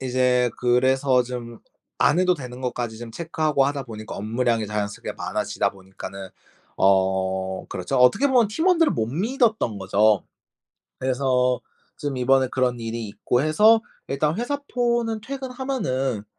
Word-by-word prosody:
이제 125 -1 +2
그래서 130 +1 +3
좀 120 -2 -7 0.4
안 170 - +3
해도 180 0 +3
되는 125 -4 -8
것까지 120 -3 -3
좀 115 -1 -8
체크하고 155 -2 0
하다 140 -1 -2
보니까 110 -3 -8
업무량이 115 +1 0
자연스럽게 105 0 -4
많아지다 105 -1 -2
보니까는 95 0 -9 0.5
어 95 -1 +1
그렇죠. 95 +9 -3
어떻게 125 - +5
보면 245 -6 +3
팀원들을 330 - +3
못 110 -1 -1
믿었던 215 - 0
거죠. 100 +2 +2 0.7
그래서 125 -1 +1 0.4
좀 145 -2 -3
이번에 130 +1 +3
그런 125 -1 0
일이 115 0 -4
있고 125 +5 0
해서 215 +9 +5 0.3
일단 150 +5 0
회사 285 +4 -1 0.2
폰은 235 -2 0
퇴근하면은 250 - -3
125 Hz, 315 characters per minute, -23 LUFS, 110-160 Hz, 0.7 s, 어떻게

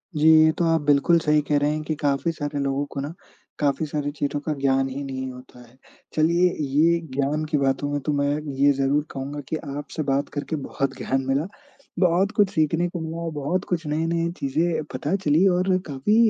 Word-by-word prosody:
जी। 150 +1 +3 0.2
ये 160 - +5
तो 170 - +1
आप 160 - +2
बिल्कुल 145 +4 +4
सही 150 -1 +2
कह 145 0 +1
रहें 145 +1 +1
हैं 155 0 -2
कि 155 0 -2
काफ़ी 145 +3 +1
सारे 145 -2 -4
लोगों 140 +1 -1
को 140 - -4
ना, 145 +3 -5 0.5
काफ़ी 145 +1 +1
सारी 145 -1 -3
चीज़ों 145 0 -1
का 155 - 0
ज्ञान 135 -1 +2
ही 135 +2 -5
नहीं 130 -1 -4
होता 125 -1 -13
है। 125 - -23 0.4
चलिए 170 +3 +3 0.2
ये 170 +3 +4 0.2
ज्ञान 145 +3 0
की 150 - +3
बातों 140 +1 0
में 145 - 0
तो 150 - +1
मैं 140 0 +1 0.3
ये 145 0 +6
ज़रूर 140 +2 +1
कहूँगा 140 +2 -5
कि 160 - -1 0.2
आपसे 150 +2 -4
बात 140 +1 0
करके 150 +2 -3
बहुत 135 -1 -2
ज्ञान 135 0 -1
मिला। 140 +6 +1 0.5
बहुत 185 +3 +3
कुछ 205 -3 +4
सीखने 160 +1 +1
को 175 -1 -5
मिला 165 +1 -4
बहुत 150 +6 -2
कुछ 170 -3 -1
नए-नए 165 +2 0
चीज़ें 155 +4 0
पता 145 +8 -1
चली 155 +6 +4
और 180 +2 0 0.2
काफ़ी 140 +9 0
150 Hz, 200 wpm, -24 LUFS, 140-165 Hz, 0.5 s, ये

